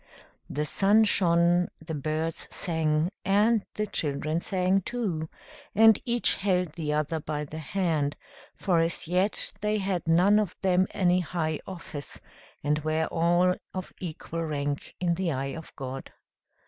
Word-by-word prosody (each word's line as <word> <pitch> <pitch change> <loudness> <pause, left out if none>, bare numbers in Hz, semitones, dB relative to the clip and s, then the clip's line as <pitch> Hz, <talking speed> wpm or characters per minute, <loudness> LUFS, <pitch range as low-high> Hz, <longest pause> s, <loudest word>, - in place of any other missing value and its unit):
The 150 +1 -1
sun 205 +7 +4
shone, 175 -3 +3
the 160 0 -7
birds 155 +2 -2
sang, 160 0 0
and 210 +3 +3
the 210 - 0
children 155 -3 -1
sang 185 +1 +1
too, 180 -9 -3 0.5
and 220 0 +7
each 240 -1 +2
held 180 -4 0
the 160 -3 -3
other 155 +2 0
by 150 0 -3
the 155 +2 -7
hand; 155 -3 -1 0.4
for 180 -4 +1
as 165 0 0
yet 185 +4 +2
they 210 0 +1
had 190 -4 -2
none 185 +6 +5
of 205 -4 -2
them 185 0 +3
any 180 -1 +2
high 160 -3 -2
office, 165 -6 -6 0.4
and 150 +1 +1
were 155 +1 0
all 175 +2 +3 0.2
of 185 -1 -5
equal 165 -1 -5
rank 145 -2 -3
in 175 -1 +1
the 175 -1 -1
eye 135 0 -2
of 160 -1 -9
God. 135 -1 -6
170 Hz, 150 wpm, -27 LUFS, 155-190 Hz, 0.5 s, and